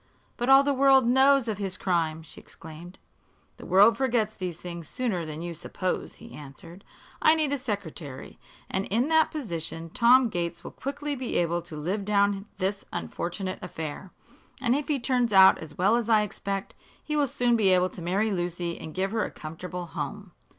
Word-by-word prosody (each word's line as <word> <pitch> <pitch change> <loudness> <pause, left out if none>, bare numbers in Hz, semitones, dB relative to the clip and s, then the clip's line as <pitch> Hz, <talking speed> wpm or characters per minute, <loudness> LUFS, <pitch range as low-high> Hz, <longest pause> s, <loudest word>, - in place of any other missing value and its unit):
"But 240 +2 -2
all 270 +1 +8
the 285 0 +1
world 270 -1 +5
knows 265 +1 +4
of 210 -2 -3
his 190 -2 -3
crime!" 165 -4 -1
she 155 - -13
exclaimed. 165 +3 -12 0.6
"The - - -11
world 200 +5 +6
forgets 235 -5 +1
these 180 -5 -5
things 170 -2 -8
sooner 210 -11 -2
than 155 +2 -6
you 175 0 -4
suppose," 180 +3 -4
he 230 +1 -13
answered. 150 +6 -12 0.4
"I 310 - +6
need 310 -3 0
a 285 - -1
secretary, 175 - -6 0.3
and 190 +1 -2
in 240 +8 +1
that 320 -1 +4
position 165 - -5
Tom 250 +2 +5
Gates 170 -3 -3
will - - -8
quickly 285 +2 -4
be 255 -2 -4
able 170 0 +1
to 170 -1 -11
live 180 +7 -2
down 200 0 +1
this 195 +1 -2
unfortunate 185 +2 -4
affair. 160 0 -6 0.5
And 245 -2 +1
if 290 0 -2
he 290 -3 0
turns 245 -2 +1
out 190 0 +7
as 155 -2 -10
well 195 +5 +3
as 235 -1 -1
I 215 -2 +5
expect, 195 -1 -4 0.3
he 300 - -3
will 290 -2 +2
soon 245 -1 +1
be 210 -4 +3
able 185 0 +3
to - - -10
marry 195 +6 0
Lucy 175 -2 -3
and 160 - -9
give 190 +1 -1
her 225 -1 0
a - - -3
comfortable 175 +3 -7
home. 165 - -6
195 Hz, 190 wpm, -27 LUFS, 175-245 Hz, 0.6 s, all